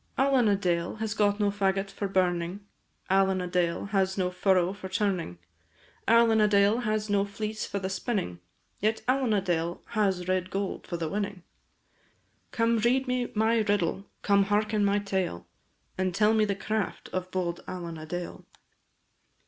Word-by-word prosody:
Allen 265 -3 +3
a 205 - +4
Dale 175 -3 -1
has 220 0 -4
no 205 -1 +5
faggot 200 -1 0
for 200 +1 -3
burning, 185 0 0 0.4
Allen 190 0 +3
a 180 - -2
Dale 175 -1 0
has 190 -1 +1
no 180 -1 0
furrow 185 -1 +2
for 190 -1 -8
turning, 185 - -1 0.7
Allen 230 -1 +5
a 210 - +5
Dale 205 +2 +4
has 215 -2 -1
no 200 -1 +2
fleece 215 +1 -4
for - - -3
the 190 -1 -2
spinning, 190 - -2 0.4
Yet 215 +2 0
Allen 255 -2 +2
a 205 -2 +3
Dale 170 -2 -2
has 195 -5 0
red 185 0 0
gold 195 0 -3
for 175 - -3
the 165 -1 -2
winning; 200 0 -3 1.1
Come, 230 0 +1
read 255 +4 +2
me 250 -1 -1
my 220 +2 +3
riddle! 200 -2 0
come, 200 -1 +4
hearken 210 +1 +1
my 200 0 +3
tale! 190 - -2 0.5
And 185 -1 0
tell 210 +2 +4
me 215 -1 +3
the 200 -1 -1
craft 215 +1 -3
of 185 0 -2
bold 175 -2 -3
Allen 170 -3 -6
a 155 - -9
Dale. 175 +2 -5
200 Hz, 165 wpm, -28 LUFS, 185-215 Hz, 1.1 s, no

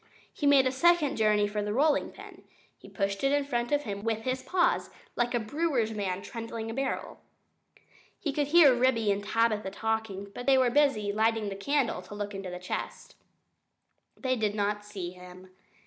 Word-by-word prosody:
He 290 - -1
made 280 -2 +6
a 255 - +2
second 310 +1 +3
journey 210 -2 +3
for 210 0 -3
the 210 +1 -2
rolling 295 +2 +2
pin. - - -13 0.3
He - - -15
pushed 195 0 -2
it 275 - +3
in 290 0 +2
front 240 -2 -2
of 290 0 +2
him 200 -3 -5
with 225 -1 -1
his 255 +1 -2
paws, 350 +2 +1 0.3
like 240 0 0
a - - +2
brewer's 260 -1 -1
man 195 -3 -3
trundling 230 -1 -6
a - - -5
barrel. 270 +2 -3 1.0
He 290 - -2
could 290 0 0
hear 300 -3 +7
Ribby 240 -4 +2
and 200 0 -1
Tabitha 215 -2 +1
talking, 210 -1 -3
but 245 - -8
they 270 -1 +6
were 255 -1 +4
too - - -7
busy 275 -9 +2
lighting 220 0 +1
the 195 - -5
candle 260 0 0
to 185 +3 -11
look 205 0 -4
into 195 -1 -6
the 180 - -6
chest. 180 0 -6 1.0
They 255 -1 0
did 215 -3 -1
not 205 0 -1
see 195 -4 -6
him. 180 +1 -13
225 Hz, 195 wpm, -29 LUFS, 205-270 Hz, 1.0 s, hear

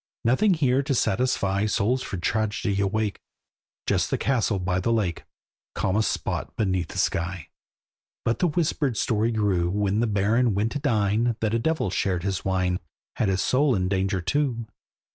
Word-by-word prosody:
Nothing 175 - +3
here 135 -4 +2
to 135 -1 -1
satisfy 105 -3 +1
Souls 115 +5 +1
for 95 - -5
tragedy 105 +1 -1
awake; 105 +1 -1 0.7
Just - - +1
the - - 0
castle 120 -6 +1
by 90 0 -1
the 105 +5 0
lake, 100 -7 -1 0.5
Calmest 105 +3 +1
spot - - -3
beneath 95 -5 0
the - - -9
sky. 85 -2 -1 0.8
But 115 - +1
the 180 - +3
whispered 150 -6 0
story 110 +2 +1
grew, 100 -6 +1
When 100 +2 0
the 120 - +2
Baron 105 +2 +2
went 105 +3 0
to 145 - -3
dine, 115 -3 +1
That 110 -1 0
a 115 - +2
devil 155 - 0
shared 90 -3 0
his 95 -2 -2
wine, 95 -1 0 0.4
Had 105 - +1
his 95 0 +1
soul 135 0 +3
in 90 -1 0
danger 95 -1 0
too. 125 - -1
105 Hz, 165 wpm, -25 LUFS, 95-120 Hz, 0.8 s, Nothing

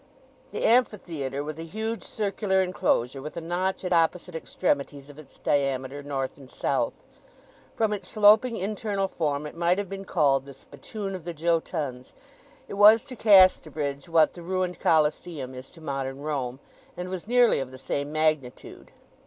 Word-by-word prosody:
The - - -2
Amphitheatre 170 - +1
was 155 +1 -6
a - - -5
huge 220 +7 -4
circular 200 -2 0
enclosure, 135 -7 0
with 150 +4 -8
a - - 0
notch 180 +3 -2
at 180 - 0
opposite 170 +1 +1
extremities 145 -3 -2
of 145 - -15
its 155 - -15
diameter 135 0 -1
north 135 -2 -4
and 135 -2 -14
south. - - -1 0.8
From 220 -2 +1
its 205 - -6
sloping 220 +3 +5
internal 200 0 -2
form 150 -5 -2
it 150 - -8
might 170 +2 +2
have 200 -2 -3
been 195 0 -6
called 140 -6 +2
the 140 - -10
spittoon 195 +10 -7
of 185 -3 -6
the 170 0 -6
Jötuns. 150 -5 -2 0.5
It - - -8
was 215 +4 +8
to 255 - -9
Casterbridge 160 - +4
what 165 -1 +4
the 175 - -10
ruined 180 +1 -2
Coliseum 155 -3 +1
is 130 +1 -10
to 165 - -17
modern 135 -2 -4
Rome, 135 -4 -3 0.4
and 180 0 -4
was 185 +1 -6
nearly 245 -1 +4
of 135 -2 -4
the 130 - -11
same 140 +2 -3
magnitude. 155 -5 -2
165 Hz, 165 wpm, -26 LUFS, 140-190 Hz, 0.8 s, was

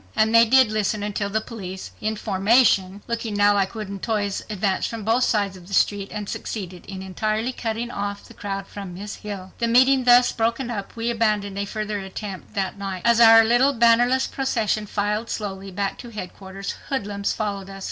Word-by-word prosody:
And 220 +1 +3
they 230 0 +8
did 255 -1 +5
listen 215 -1 -1
until 205 -1 -2
the 220 +2 0
police, 190 -5 -7
in 215 +1 -1
formation—looking 210 +1 +1
now 205 0 +5
like 195 +1 0
wooden 200 -3 -5
toys—advanced 205 -2 -1
from 225 -2 -6
both 230 +4 +2
sides 200 -3 0
of 180 -1 -13
the 195 - -3
street 200 -1 +1
and 210 -1 -5
succeeded 185 -5 -6
in 190 -1 -7
entirely 215 +5 -1
cutting 235 -1 -3
off 200 -1 -4
the - - -14
crowd 195 -1 -5
from 195 -3 -8
Miss 200 +3 -7
Hill. 195 -3 -7
The 235 - +1
meeting 260 +2 +4
thus 245 0 +6
broken 235 +2 -1
up, 200 -4 -6
we 230 +1 -1
abandoned 210 -3 0
a 200 - -1
further 210 0 -3
attempt 190 0 -7
that 195 0 -2
night. 195 -2 -5
As 235 0 +5
our 225 0 +9
little, 240 +5 +4
bannerless 240 +2 +4
procession 220 -5 -1
filed 210 +3 -1
slowly 195 -2 -4
back 195 +1 -3
to 240 - -9
headquarters, 195 -2 -7 0.2
hoodlums 205 -6 -2
followed 200 -3 -3
us. 195 0 -9
210 Hz, 185 wpm, -23 LUFS, 195-230 Hz, 0.2 s, our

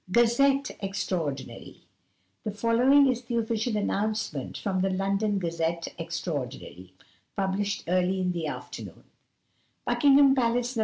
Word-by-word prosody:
GAZETTE 270 +5 +3
EXTRAORDINARY 170 -8 -4 0.6
The - - -2
following 235 +7 +4
is 250 -2 0
the 235 -1 -2
official 225 0 -1
announcement 210 - -2
from 190 -2 -1
the 195 - +1
London 195 +2 0
Gazette 170 -1 -2
Extraordinary, 140 - -5 0.4
published 200 +1 -1
early 185 +2 +1
in 180 -1 0
the 170 -3 -3
afternoon: - - -8 0.8
"Buckingham 280 -1 +5
Palace, 245 -1 0
Nov. - - -1
200 Hz, 115 wpm, -27 LUFS, 175-235 Hz, 0.8 s, Buckingham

